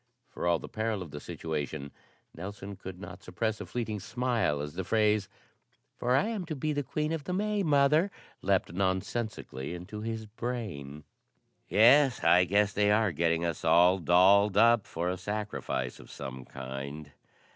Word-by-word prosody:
For - - -3
all 85 -1 +4
the - - -9
peril 110 -3 -2
of 80 - -12
the 75 - -6
situation 75 -3 -4 0.4
Nelson 100 +3 -7
could 95 -1 -9
not 95 -1 -9
suppress 105 +4 -3
a - - -7
fleeting 110 -4 -3
smile 115 - 0
as 75 0 -5
the 95 - -3
phrase, 105 0 +2 0.7
"For 125 +1 +1
I'm 210 +6 0
to 160 - -3
be 150 +3 -1
Queen 150 +3 -2
of 160 -3 -3
the 180 - -3
May, 210 +2 0
Mother," 150 +2 +4 0.3
leaped 95 -3 +1
nonsensically 95 - -2
into 90 +5 -7
his 110 0 -4
brain. 105 - -5 0.7
"Yes, 125 - +5
I 90 +2 +6
guess 100 +3 +2
they 105 0 +2
are 105 -1 +3
getting 85 +1 +1
us 85 -2 -3
all 90 +3 +5
dolled 95 +4 +5
up 115 0 +5
for 85 +2 -3
a 90 +1 -1
sacrifice 105 - -3
of - - -14
some 65 -1 -7
kind." 70 +3 -7
100 Hz, 160 wpm, -30 LUFS, 85-115 Hz, 0.7 s, I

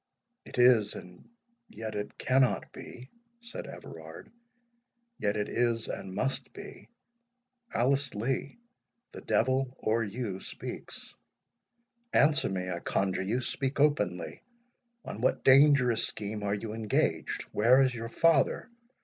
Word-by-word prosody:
"It - - -10
is—and 105 -7 +2 0.4
yet 110 -1 -6
it 105 0 -5
cannot 130 -1 +2
be," 125 +2 -11 0.3
said 235 +1 -7
Everard; - - -10 0.9
"yet 105 +1 0
it 105 0 -1
is, 115 -2 0
and 95 -1 -6
must 135 +4 -1
be. - - -11 0.8
Alice 135 +2 +1
Lee, 130 - -2 0.5
the - - -9
devil 130 +1 +1
or 115 +1 0
you 105 -2 -4
speaks. - - -8 1.0
Answer 150 +1 +4
me, 90 -1 -3
I 85 - -3
conjure 95 +2 -1
you!—speak 130 +6 -2
openly—on 235 - -3
what 130 - +1
dangerous 135 -3 +6
scheme 105 0 -4
are 100 0 0
you 105 +1 -5
engaged? 110 -2 0
where 120 +5 +5
is 130 -2 +3
your 115 -1 -5
father? 165 - +2
120 Hz, 115 wpm, -30 LUFS, 105-135 Hz, 1.0 s, dangerous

